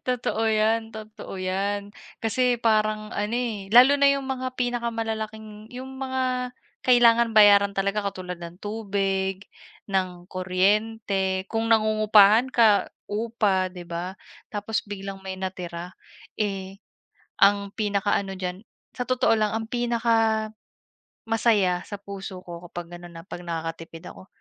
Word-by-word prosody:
Totoo 245 -3 -1
yan, 220 +1 +1
totoo 215 -2 -9
yan. 200 +2 -2 0.3
Kasi 245 +2 +1
parang 215 -1 +1
ano, 210 +3 -1
eh, 220 -6 -3
lalo 255 +4 +8
na 280 0 +5
yung 275 -1 0
mga 255 -1 -3
pinakamalalaking, 220 -3 -3
'yong 255 +1 -7
mga 255 -1 -2 0.3
kailangan 235 -2 +5
bayaran 200 -1 +6
talaga 200 +2 0
katulad 180 -2 -7
ng 170 +1 -9
tubig, 195 -2 -2 0.5
ng 185 -2 -2
kuryente, 190 +1 0
kung 225 0 -1
nangungupahan 215 +2 +5
ka, 220 -4 +5 0.2
upa, 205 -4 0
'di 180 -1 -8
ba? 170 +2 -5 0.4
Tapos 210 +1 -2
biglang 195 -1 -7
may 190 0 -5
natira, 180 -1 -5 0.5
eh, 195 -2 -3 0.6
ang 200 0 +4
pinakaano 200 -2 0
diyan, 180 -1 -4 0.4
sa 250 - -2
totoo 255 -2 +3
lang 215 -1 +1
ang 225 0 -2
pinaka, 230 -2 +1 0.7
masaya 215 -5 +2
sa 205 - -7
puso 195 -2 -7
ko 175 0 -9
kapag 175 0 -8
ano 175 - -11
na 165 -1 -11
'pag 175 -1 -9
nakakatipid 165 0 -6
ako 185 - -13
210 Hz, 130 wpm, -25 LUFS, 190-225 Hz, 0.7 s, lalo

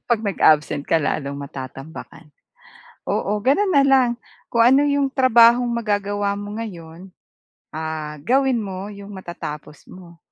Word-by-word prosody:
'Pag 235 -2 +2
nag-absent 155 -6 +2
ka 165 - +2
lalong 140 -1 -2
matatambakan. 140 +1 -9 0.8
Oo, 205 +1 -1
gano'n 375 - +2
na 280 -1 +5
lang 265 -3 +4 0.4
kung 235 - +3
ano 265 +4 +5
'yong 280 -1 +1
trabahong 240 -1 +5
magagawa 205 -3 -1
mo 205 0 -7
ngayon, 175 -3 -9 0.6
ah, 155 -1 -5
gawin 260 - +2
mo 195 -1 -6
'yong 200 0 -11
matatapos 170 -6 -8
mo. 170 -2 -14
200 Hz, 130 wpm, -21 LUFS, 160-240 Hz, 0.8 s, na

